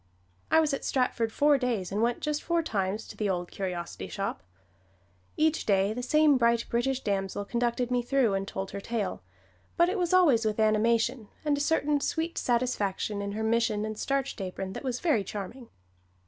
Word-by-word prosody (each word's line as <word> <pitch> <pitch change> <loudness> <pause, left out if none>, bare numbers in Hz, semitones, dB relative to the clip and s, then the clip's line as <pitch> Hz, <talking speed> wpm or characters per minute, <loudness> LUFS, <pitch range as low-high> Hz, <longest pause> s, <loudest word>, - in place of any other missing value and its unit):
I 320 - +5
was 310 -2 +2
at 275 - -3
Stratford 245 -3 0
four 290 +3 +4
days 235 -8 -1
and 205 +2 -1
went 240 +1 +1
just 300 -1 -1
four 340 0 0
times 205 -5 -2
to - - -10
the 210 -2 -1
old 180 -2 -2
curiosity 180 -3 -4
shop. 200 -1 -4 1.0
Each 315 0 +2
day 200 0 +2
the 245 - -4
same 300 +2 +4
bright 235 -1 +3
British 260 +3 0
damsel 195 0 -2
conducted 240 +2 -1
me 245 -1 +2
through, 245 -3 +2
and 195 0 -1
told 195 0 -5
her 200 - -5
tale, 225 - -3 0.6
but 345 +1 +5
it 390 +2 -1
was 350 -2 0
always 320 -11 +5
with 215 0 -1
animation, 220 +2 +2 0.2
and 295 -1 +3
a 285 - -2
certain 295 -1 +2
sweet 325 +3 -1
satisfaction 215 -4 0
in 200 0 -4
her 220 +1 -3
mission 220 -1 +1
and 215 0 -4
starched 275 0 -2
apron 190 0 -5
that - - -7
was 255 -2 -2
very 300 - +2
charming. 215 +5 -7
235 Hz, 190 wpm, -28 LUFS, 205-275 Hz, 1.0 s, I